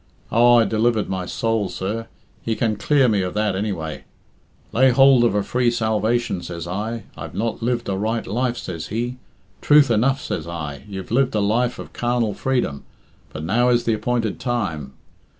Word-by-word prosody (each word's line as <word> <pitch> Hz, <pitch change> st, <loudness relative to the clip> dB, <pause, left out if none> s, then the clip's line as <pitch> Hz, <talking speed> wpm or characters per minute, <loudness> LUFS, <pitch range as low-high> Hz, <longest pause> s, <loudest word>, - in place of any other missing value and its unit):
Oh, 120 Hz, +1 st, +6 dB
I 115 Hz, -, +5 dB
delivered 110 Hz, +1 st, +1 dB
my 95 Hz, -2 st, -3 dB
soul, 115 Hz, -1 st, -1 dB
sir; 110 Hz, +4 st, -4 dB, 0.3 s
he 115 Hz, -, -2 dB
can 110 Hz, -2 st, 0 dB
clear 135 Hz, +4 st, +3 dB
me 105 Hz, -4 st, +2 dB
of 90 Hz, +1 st, -3 dB
that, 105 Hz, -2 st, +1 dB
anyway. 95 Hz, -6 st, -3 dB, 0.7 s
'Lay 130 Hz, +3 st, +4 dB
hould 135 Hz, 0 st, +6 dB
of 115 Hz, -4 st, +2 dB
a 105 Hz, -, +1 dB
free 125 Hz, +2 st, +1 dB
salvation,' 110 Hz, -2 st, 0 dB
says 85 Hz, -1 st, -6 dB
I. 105 Hz, +5 st, -4 dB
'I've -, -, -8 dB
not 115 Hz, +2 st, -2 dB
lived 120 Hz, 0 st, -1 dB
a 100 Hz, -, -1 dB
right 110 Hz, +3 st, -1 dB
life,' 120 Hz, +4 st, -1 dB
says 85 Hz, -6 st, -6 dB
he. 120 Hz, +4 st, -3 dB, 0.4 s
'Truth 145 Hz, -3 st, +5 dB
enough,' 130 Hz, +5 st, +2 dB
says -, -, -4 dB
I; 80 Hz, -1 st, -6 dB
'you've 95 Hz, -1 st, -7 dB
lived 130 Hz, 0 st, +2 dB
a -, -, +2 dB
life 120 Hz, +5 st, +1 dB
of -, -, -9 dB
carnal 120 Hz, -3 st, 0 dB
freedom, 125 Hz, -, -1 dB, 0.5 s
but 75 Hz, -, -6 dB
now 120 Hz, +9 st, +2 dB
is 120 Hz, -1 st, +3 dB
the 115 Hz, -, +1 dB
appointed 115 Hz, 0 st, -1 dB
time. 90 Hz, -, -3 dB
115 Hz, 180 wpm, -22 LUFS, 100-120 Hz, 0.7 s, Oh